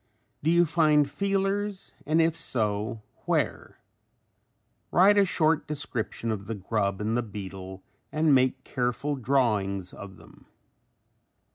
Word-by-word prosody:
Do 155 - +1
you 170 +1 +5
find 150 -3 +3
feelers 195 +4 -2
and 155 +2 +3
if 165 0 +3
so 110 -3 -2 0.2
where? - - -1 1.1
Write 195 +3 +6
a 200 - +5
short 160 -3 +1
description 125 -6 -3
of 100 -2 -5
the 115 - -3
grub 100 0 -1
and 110 +2 -1
the 120 - +1
beetle 95 -3 -8 0.3
and 155 -1 +3
make 130 0 +2
careful 125 +4 -2
drawings 105 -8 0
of 95 -2 -10
them. - - -18
130 Hz, 125 wpm, -27 LUFS, 105-160 Hz, 1.1 s, Write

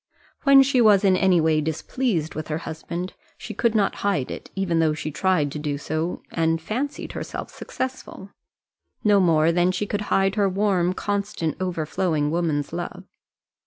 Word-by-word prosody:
When 275 -1 +8
she 265 -2 +2
was 210 -3 +5
in 190 -2 +5
any 185 -2 +3
way 155 -1 +2
displeased 160 - -2
with 155 - -5
her 150 - -2
husband, 170 +3 -5 0.2
she - - -7
could 230 -2 +1
not 205 -2 +1
hide 195 -10 0
it, - - -8
even 180 -4 0
though 155 -2 +2
she 155 -1 -4
tried 150 -1 +1
to 150 - -5
do 145 -1 -2
so, 155 +4 -3
and 165 0 +1
fancied 250 - -4
herself - - -6
successful; 260 -6 -6 0.7
no 205 -1 +5
more 165 -3 +4
than 175 +1 +2
she 185 +3 -2
could 205 0 -2
hide 195 0 +2
her 200 -1 +2
warm, 190 -2 +1
constant, 200 -5 -2
overflowing 160 -3 -1
woman's 160 -3 -1
love. 175 +2 -5
180 Hz, 165 wpm, -24 LUFS, 160-200 Hz, 0.7 s, When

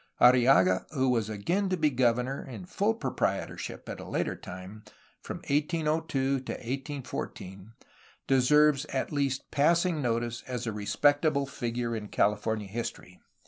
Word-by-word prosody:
Arrillaga, 120 -7 +5
who 130 -3 +2
was 115 -4 +1
again 175 - -1
to 185 - 0
be 155 -2 +2
governor 125 +1 +1
(in 135 +7 -8
full 205 +4 0
proprietorship, - - -3
at - - -6
the - - -7
later - - -2
time) 95 +4 -9 0.4
from - - -6
1802 150 -2 0
to 130 - -5
1814, 120 -6 -6 0.5
deserves 145 +2 +4
at 135 -3 -3
least 140 -3 -1
passing 170 +2 +2
notice 120 -1 -1
as 125 -2 -3
a 115 - -1
respectable 145 +7 +2
figure 120 -3 -3
in 105 -1 -5
California 105 +1 0
history. 100 -4 -6
130 Hz, 135 wpm, -29 LUFS, 115-150 Hz, 0.5 s, Arrillaga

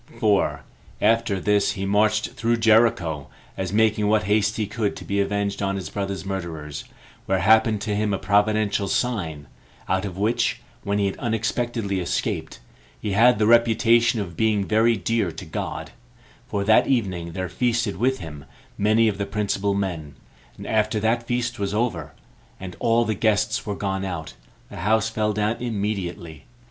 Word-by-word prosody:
4. 85 -9 +1 0.4
After 115 -3 +2
this 100 +1 +2
he 95 -2 -4
marched 110 +2 +2
through 115 +1 0
Jericho, 110 -10 +3 0.3
as 95 -2 -3
making 110 0 +2
what 105 0 +3
haste 105 +2 +1
he 110 - 0
could 105 0 -2
to - - -9
be 100 0 0
avenged 100 0 -1
on 100 0 0
his 95 -2 -5
brother's 100 -1 -4
murderers; 80 -6 -5 0.4
where 95 - +2
happened 110 +2 +4
to 105 -1 -2
him 105 0 0
a 100 - 0
providential 105 +2 +1
sign, 85 -11 -2 0.4
out 95 +1 0
of 95 -3 -5
which, 110 +4 0 0.2
when 100 +1 -1
he 100 - +1
had 95 - -2
unexpectedly 115 -2 -1
escaped, 90 - -3 0.4
he 105 - -3
had 115 +4 +5
the 105 - +2
reputation 115 0 +4
of 90 -5 -5
being 105 +1 +1
very 110 +2 +3
dear 100 0 0
to - - -9
God; - - -5 0.6
for 100 - -2
that 110 +2 +4
evening 95 -10 -1
there 95 +1 -3
feasted 115 +3 0
with 130 +5 +1
him 75 -5 -9 0.3
many 110 +2 +4
of 100 -2 -1
the 100 - -2
principal 100 -1 -1
men; 85 -8 -3 0.4
and - - -9
after 110 0 +1
that 115 +2 0
feast 120 -1 -2
was 100 0 -2
over, 100 -10 -2 0.5
and 95 -1 -7
all 115 0 +2
the 110 - 0
guests 110 +1 0
were 105 - -2
gone 95 -1 -2
out, 90 -5 -5 0.4
the - - -9
house 110 +4 +1
fell 110 -1 0
down 105 +2 -1
immediately. 100 -7 -4
105 Hz, 170 wpm, -23 LUFS, 95-110 Hz, 0.6 s, had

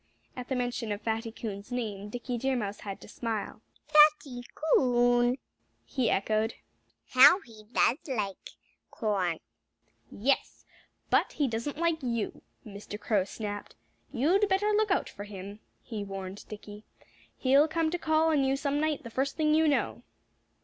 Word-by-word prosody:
At 250 -1 -6
the 265 - 0
mention 245 -3 -2
of 205 +1 -3
Fatty 225 0 -2
Coon's 210 -1 -7
name 210 -5 -3
Dickie 245 +2 -4
Deer 265 +2 0
Mouse 205 -4 -3
had 195 -2 -6
to - - -11
smile. 220 -2 -4 0.2
"Fatty 300 -4 +5
Coon!" 245 -4 +3 0.5
he 255 -4 0
echoed. 215 +3 +1 0.5
"How 280 +8 +8
he 220 - -15
does 255 +3 +3
like 210 -8 -3 0.4
corn!" 195 -7 -1 0.7
"Yes! 265 +6 -1 0.5
But - - +3
he 290 - +1
doesn't 235 +5 -3
like 335 -1 +1
you," 235 -4 -2 0.2
Mr. 205 0 -8
Crow 205 -5 +1
snapped. 205 0 -6 0.4
"You'd 375 - +2
better 400 +2 +2
look 425 0 +2
out 385 - +1
for 205 - -8
him," 200 0 -8 0.2
he 220 -4 -5
warned 195 0 -7
Dickie. 210 0 -9 0.5
"He'll 275 +3 +4
come 320 0 0
to 355 - -2
call 315 0 +2
on 295 -3 +3
you 270 0 +2
some 285 0 -1
night, 310 -2 0
the 235 - -8
first 270 +3 -1
thing 305 -1 +3
you 315 0 +4
know. 290 - 0
245 Hz, 155 wpm, -29 LUFS, 210-295 Hz, 0.7 s, How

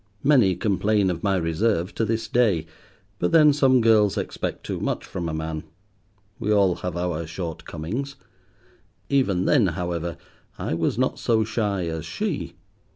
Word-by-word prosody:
Many 125 -10 +4
complain 100 -1 +1
of 85 -1 -5
my 100 -2 +1
reserve 90 +2 0
to - - -1
this 110 +1 -1
day, 105 -10 +2 0.5
but 90 - 0
then 150 -2 +6
some 130 -3 +4
girls 110 -3 +4
expect - - -4
too - - -3
much - - -2
from 85 -2 -4
a - - -2
man. 80 0 -4 0.8
We 105 - -1
all 100 -4 +3
have 90 -1 -4
our 85 -2 -2
shortcomings. 85 - -5 0.9
Even 100 -10 +2
then, 125 -9 +4
however, 85 -1 -3 0.4
I - - -3
was 85 +5 0
not 130 +1 0
so 110 -2 +2
shy 105 -4 -1
as 80 -2 -4
she. - - -3
95 Hz, 155 wpm, -24 LUFS, 85-115 Hz, 0.9 s, then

